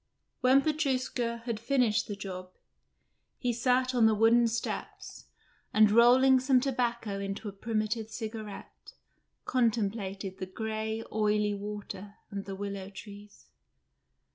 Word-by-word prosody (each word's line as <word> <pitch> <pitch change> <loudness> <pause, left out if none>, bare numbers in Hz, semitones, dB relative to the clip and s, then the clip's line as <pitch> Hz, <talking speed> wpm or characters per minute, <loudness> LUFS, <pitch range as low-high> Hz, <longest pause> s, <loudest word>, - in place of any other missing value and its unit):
When 260 +2 +5
Petrushka 255 -6 -1
had 230 -3 -2
finished 235 -3 +1
the 205 - -4
job, 185 -2 -7 0.9
he 245 -2 -1
sat 255 +2 +1
on 235 -3 +5
the 220 - +3
wooden 230 +2 +5
steps, 230 +1 -5 0.5
and 215 -1 +6
rolling 255 +3 +6
some 260 0 +4
tobacco 240 -6 -1
into 200 +2 -4
a - - -4
primitive 215 +1 -2
cigarette, 220 -2 -8 0.5
contemplated 205 -5 -1
the 185 - -4
grey, 220 +2 -3
oily 210 -1 +1
water 205 0 -7 0.2
and 200 -1 -5
the 195 - -5
willow 200 -1 -5
trees. 205 +1 -12
220 Hz, 120 wpm, -30 LUFS, 205-240 Hz, 0.9 s, and